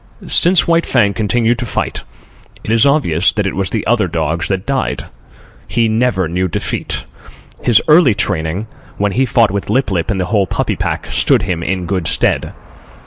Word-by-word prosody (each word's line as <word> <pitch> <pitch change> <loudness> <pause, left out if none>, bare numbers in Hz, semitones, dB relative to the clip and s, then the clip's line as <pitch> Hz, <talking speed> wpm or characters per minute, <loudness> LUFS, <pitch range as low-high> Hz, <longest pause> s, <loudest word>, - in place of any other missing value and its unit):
Since 180 +1 +4
White 170 0 +2
Fang 105 -6 +2
continued 115 +3 0
to 120 - -3
fight, - - -3 0.6
it - - -4
is 115 +3 +4
obvious 100 - +2
that 105 -2 -1
it 95 - -2
was 95 -2 -1
the - - -3
other - - +2
dogs 80 +1 -2
that 95 -1 -2
died. 135 -1 -2 0.6
He 115 -1 +1
never 110 -5 0
knew 90 +3 -1
defeat. 85 - -4 0.6
His 120 -3 +3
early 150 - +5
training, 90 +2 -2 0.3
when 100 0 0
he 130 +7 +1
fought 115 -3 +3
with 100 0 -4
Lip 125 0 +1
lip 85 0 -1
and 100 -3 -1
the 90 - 0
whole 100 0 +1
puppy - - -2
pack, - - -3
stood - - +2
him 90 -3 -2
in 90 +1 -2
good 90 -3 -2
stead. - - +1
100 Hz, 185 wpm, -15 LUFS, 90-120 Hz, 0.6 s, early